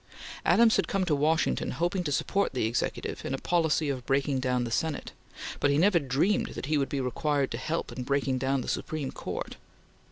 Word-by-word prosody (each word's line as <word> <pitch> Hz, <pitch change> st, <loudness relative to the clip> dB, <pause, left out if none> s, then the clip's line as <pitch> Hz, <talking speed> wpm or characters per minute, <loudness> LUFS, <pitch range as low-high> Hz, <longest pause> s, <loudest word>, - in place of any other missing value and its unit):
Adams 230 Hz, -1 st, +5 dB
had -, -, +1 dB
come 195 Hz, -2 st, 0 dB
to 165 Hz, -, +1 dB
Washington 155 Hz, +3 st, +1 dB
hoping 175 Hz, +2 st, 0 dB
to 150 Hz, -, -2 dB
support 195 Hz, +6 st, 0 dB
the 125 Hz, -, +1 dB
Executive 115 Hz, +2 st, -2 dB
in 135 Hz, -, -2 dB
a -, -, -4 dB
policy 160 Hz, -1 st, +1 dB
of 130 Hz, -3 st, -2 dB
breaking 135 Hz, 0 st, +1 dB
down 125 Hz, -1 st, 0 dB
the 120 Hz, -, -4 dB
Senate, 155 Hz, +5 st, -1 dB, 0.5 s
but 145 Hz, -, +3 dB
he 140 Hz, -, +3 dB
never 180 Hz, +2 st, +4 dB
dreamed 145 Hz, +9 st, 0 dB
that -, -, -4 dB
he 155 Hz, +2 st, +1 dB
would 135 Hz, -, -1 dB
be 140 Hz, -, -2 dB
required 140 Hz, +2 st, 0 dB
to 115 Hz, -, -3 dB
help 160 Hz, +5 st, -2 dB
in 130 Hz, -, -5 dB
breaking 135 Hz, 0 st, 0 dB
down 135 Hz, +1 st, +1 dB
the -, -, -7 dB
Supreme 150 Hz, -4 st, -3 dB
Court. -, -, -5 dB
140 Hz, 210 wpm, -28 LUFS, 130-165 Hz, 0.5 s, Adams